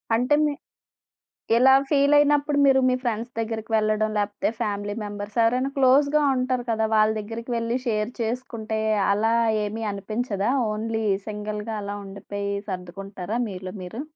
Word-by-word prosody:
అంటే 250 +5 +3
మి 295 - 0 1.0
ఇలా 265 +3 +6 0.2
ఫీల్ 285 0 +4
అయినప్పుడు 290 0 +3
మీరు 265 -1 +5
మీ - - +2
ఫ్రెండ్స్ 235 +1 -2
దగ్గరికి 225 0 -4
వెళ్ళడం, 215 0 +1
లేకపోతే 205 0 -1
ఫ్యామిలీ 205 -1 -2
మెంబర్స్ 205 +1 -6
ఎవరైనా 250 +4 +2
క్లోజ్‌గా 280 +3 +4
ఉంటారు 255 -1 0
కద. 220 -1 0 0.2
వాళ్ళ 215 0 +4
దగ్గరికి 230 +3 -6
వెళ్లి 230 +2 -1
షేర్ 215 +1 0
చేసుకుంటే 225 -2 -3 0.3
అలా 220 +3 +2 0.3
ఏమీ 220 +2 -4
అనిపించదా? 205 +1 -2 0.2
ఓన్లీ 220 0 -2 0.2
సింగిల్‌గా 210 +1 -4
అలా 205 0 -4
ఉండిపోయి 200 +1 -5 0.2
సర్దుకుంటారా 195 +3 -5
మీలో 185 -1 -7
మీరు? 200 +9 -6
220 Hz, 135 wpm, -24 LUFS, 205-250 Hz, 1.0 s, ఇలా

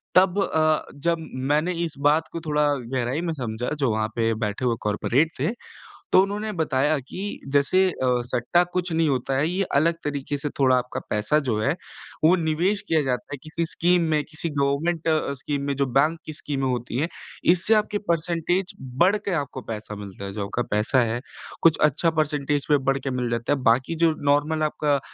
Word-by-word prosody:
तब 185 +1 +5
अ, 155 -3 +1
जब 170 +4 0 0.3
मैंने 155 +5 +2
इस 160 - -6
बात 150 +3 +3
को 165 - -3
थोड़ा 150 -2 +1
गहराई 130 +3 -2
में 170 -2 -2
समझा, 120 -4 -3
जो 135 -5 +2
वहाँ 110 0 0
पे 115 -1 +1
बैठे 105 +4 -2
हुए 120 -2 +2
कॉर्पोरेट 125 +9 +1
थे, - - +1 0.6
तो 185 - +8
उन्होंने 205 +2 -3
बताया 150 -2 +1
कि 185 - -6 0.3
जैसे 185 +7 +4
अ, - - -5 0.3
सट्टा 125 +9 +2
कुछ 180 -1 -1
नहीं 160 0 +2
होता 135 0 -1
है। 145 +3 +2
ये 190 +2 0
अलग 165 +4 +3
तरीके 145 0 -3
से 145 +1 -3
थोड़ा 130 -2 +5
आपका 125 0 -3
पैसा 105 +8 +2
जो 110 -3 +1
है, 140 +6 +2 0.5
वो 170 +4 +6
निवेश 175 +5 0
किया 160 -1 +3
जाता 130 +1 -2
है - - -4
किसी 160 +2 -2
स्कीम 175 +1 +3
में, 150 -1 +2
किसी 160 +2 -5
गवर्नमेंट 150 +4 0
अ, 155 -3 +1
स्कीम 140 +1 -3
में 140 - 0
जो 140 0 +1
बैंक 155 +4 +3
की 155 - -6
स्कीमें 140 -2 -3
होती 125 -1 -2
हैं। 155 - +1 0.5
इससे 185 +5 +2
आपके 210 -1 +1
परसेंटेज 170 +2 0 0.3
बढ़ 195 +4 +4
के 200 - -1
आपको 140 -2 -7
पैसा 105 -1 -6
मिलता 100 -1 -8
है। 100 - -6
जो 100 -1 -3
आपका 120 +4 -2
पैसा 105 +5 +2
है, 115 +1 -1 0.4
कुछ 165 -2 +5
अच्छा 165 +4 +1
परसेंटेज 145 -1 0
पे 150 - +6
बढ़ 135 0 +2
के 135 - -4
मिल 125 -1 -1
जाता 115 +3 0
है। 145 - -1
बाकी 130 +8 +2
जो 165 - +5 0.2
नार्मल 155 +2 +1
आपका 150 -2 +1
150 Hz, 200 wpm, -24 LUFS, 130-165 Hz, 0.6 s, तो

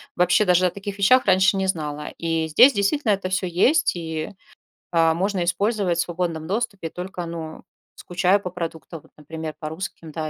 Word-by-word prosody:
Вообще 180 +4 +3
даже 180 0 +4
о 180 - -2
таких 200 0 -7
вещах 255 +6 +5
раньше 190 0 +4
не 190 - 0
знала. 150 -4 -3
И 165 -1 -1
здесь 245 - +7
действительно 215 +4 +1
это 195 -1 -3
всё 185 0 -1
есть 195 - +2
и, 160 -2 -4 0.6
а, 165 -1 +3
можно 185 +1 -1
использовать 185 0 0
в - - +4
свободном 165 -2 -3
доступе, 200 -4 -3
только, 180 +1 -6
ну, 160 -1 -7 0.3
скучаю 180 +3 +1
по 180 - -5
продуктам, 165 -2 -7
вот - - -23
например, 155 0 -7
по 155 - -5
русским, 160 -1 -7
да, 155 0 -4
180 Hz, 180 wpm, -23 LUFS, 160-195 Hz, 0.6 s, здесь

